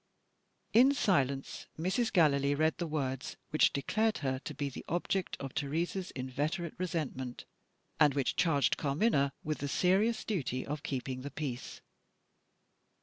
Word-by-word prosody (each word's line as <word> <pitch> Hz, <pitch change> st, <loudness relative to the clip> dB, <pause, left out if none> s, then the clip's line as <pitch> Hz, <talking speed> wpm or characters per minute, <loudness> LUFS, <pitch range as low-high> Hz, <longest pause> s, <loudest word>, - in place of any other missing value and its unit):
In 260 Hz, +5 st, +6 dB
silence, 140 Hz, -, 0 dB
Mrs. 190 Hz, +8 st, 0 dB
Gallilee 145 Hz, -5 st, +4 dB
read 155 Hz, +2 st, +1 dB
the 170 Hz, -, -1 dB
words 135 Hz, -4 st, -3 dB
which 155 Hz, -, +4 dB
declared 215 Hz, +10 st, +1 dB
her 130 Hz, -1 st, 0 dB
to -, -, -5 dB
be 145 Hz, -, -2 dB
the 135 Hz, -, -7 dB
object 175 Hz, +2 st, -1 dB
of 135 Hz, -2 st, -6 dB
Teresa's 165 Hz, +6 st, -2 dB
inveterate 150 Hz, +7 st, -2 dB
resentment, 150 Hz, -8 st, -3 dB, 0.5 s
and 145 Hz, -2 st, +5 dB
which 140 Hz, -2 st, 0 dB
charged 145 Hz, -7 st, +2 dB
Carmina 140 Hz, 0 st, +2 dB
with 155 Hz, 0 st, -2 dB
the 145 Hz, -, -2 dB
serious 195 Hz, +9 st, +2 dB
duty 135 Hz, -, -2 dB
of 150 Hz, +1 st, -4 dB
keeping 130 Hz, -2 st, -3 dB
the 140 Hz, -, -5 dB
peace. 135 Hz, -4 st, -5 dB
150 Hz, 140 wpm, -32 LUFS, 135-180 Hz, 0.5 s, In